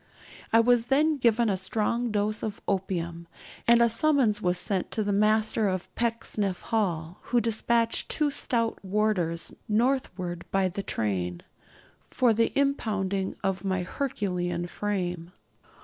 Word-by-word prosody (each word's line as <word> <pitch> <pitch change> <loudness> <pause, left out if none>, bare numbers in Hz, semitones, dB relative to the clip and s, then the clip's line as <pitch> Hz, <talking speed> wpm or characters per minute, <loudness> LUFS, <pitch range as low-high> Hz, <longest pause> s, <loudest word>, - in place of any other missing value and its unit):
I 225 - +6
was 240 0 +3
then 300 +3 +3
given 235 -2 +3
a 200 - +2
strong 220 +5 -1
dose 210 +1 -1
of 210 -2 -4
opium, 170 -3 -2 0.4
and 235 0 +6
a - - +5
summons 230 -3 +2
was 180 -2 +1
sent 190 0 -1
to 220 - -1
the 205 0 0
Master 215 +1 +2
of 185 -1 -3
Pecksniff 225 -5 -1
Hall, 175 -6 -2
who 245 - +2
despatched 230 0 +1
two 300 -2 +1
stout 230 -5 0
warders 190 -5 0 0.2
northward 210 -7 0
by 195 -1 +1
the 190 +3 -4
train, 90 - -2 0.6
for 245 -3 +2
the 230 +1 +2
impounding 205 -9 0
of 195 -1 -1
my 190 -2 -1
Herculean 180 -7 -2
frame. 180 -3 -3
205 Hz, 135 wpm, -27 LUFS, 185-230 Hz, 0.6 s, I